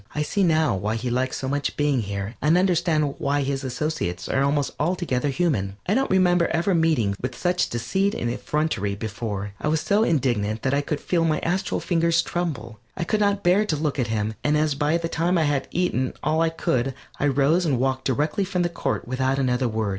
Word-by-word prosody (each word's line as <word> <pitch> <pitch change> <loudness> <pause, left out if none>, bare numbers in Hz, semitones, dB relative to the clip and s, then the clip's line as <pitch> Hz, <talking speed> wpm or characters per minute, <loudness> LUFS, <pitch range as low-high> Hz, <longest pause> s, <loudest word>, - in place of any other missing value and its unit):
I 150 - +1
see 200 +7 -1
now 160 - +3
why 105 +3 -2
he 120 +2 -3
likes 130 +2 0
so 130 - -4
much 145 +1 -2
being 145 -4 +2
here, 100 +1 -4
and 155 +4 +4
understand 170 -5 +2
why 145 -1 0
his 135 0 -2
associates 130 - -3
are 135 - +1
almost 140 0 +1
altogether 150 -5 0
human. 130 - -1
I 185 - +1
don't 270 +4 +1
remember 180 -2 +3
ever 170 +4 +1
meeting 155 - +2
with 125 -1 -4
such 180 0 +1
deceit 190 - 0
and 120 - -2
effrontery 125 -7 -1
before. 105 -1 -4
I - - -1
was 155 +1 +2
so 205 +6 +2
indignant 120 - 0
that 130 - +1
I 140 - +2
could 145 0 -3
feel 170 -2 +1
my 155 -2 +2
astral 185 +2 -1
fingers 170 -1 +2
tremble. 115 - -4 0.2
I 180 - -1
could 210 +5 0
not 200 -1 +1
bear 180 +4 +4
to 185 -7 -1
look 150 -1 -2
at 125 - +1
him, 110 -1 -1
and 150 +1 +2
as 150 -1 +2
by 150 +3 +1
that 165 0 -4
time 175 +3 +1
I 165 - +3
had 145 -2 0
eaten 130 -8 0
all 160 +1 +1
I 165 - +3
could, 135 -5 -1 0.2
I 145 - +2
rose 145 +6 +3
and 145 -7 +1
walked 130 0 0
directly 150 - 0
from 185 -2 -1
the 175 - 0
court 170 - -3
without 130 +2 0
another 130 -1 +1
word. 110 -1 -1
145 Hz, 215 wpm, -24 LUFS, 125-170 Hz, 0.2 s, and